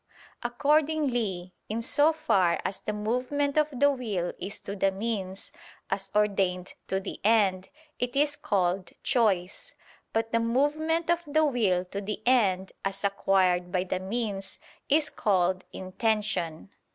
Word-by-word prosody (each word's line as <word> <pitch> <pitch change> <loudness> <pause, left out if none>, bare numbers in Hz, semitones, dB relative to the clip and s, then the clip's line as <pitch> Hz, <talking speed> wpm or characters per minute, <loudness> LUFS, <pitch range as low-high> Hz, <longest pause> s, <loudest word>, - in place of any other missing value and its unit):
Accordingly, 245 - 0 0.2
in 225 +2 -2
so 290 +6 +4
far 190 - +2
as 195 - -3
the - - -3
movement 250 +7 -1
of 305 -1 +4
the 285 +2 +3
will 210 -10 -2
is 200 +3 -5
to 200 - -6
the 195 0 +2
means, 195 -2 -4 0.4
as 195 -1 -1
ordained 195 -3 +1
to 190 - 0
the 195 - -7
end, 195 -4 +3 0.3
it 245 +1 -2
is 290 +1 +3
called 185 - -1
"choice": 205 -8 0 0.4
but 225 0 -1
the 230 - +2
movement 305 +8 +1
of 345 0 +1
the 310 +2 +3
will 205 -10 +1
to 200 +2 -5
the 205 +1 -4
end 195 -7 +2
as 195 0 -2
acquired 185 -3 +2
by 180 0 +1
the 185 0 -2
means, 195 0 -3 0.3
is 295 +1 +3
called 185 -2 +1
"intention." 195 -3 -2
210 Hz, 140 wpm, -28 LUFS, 190-255 Hz, 0.4 s, so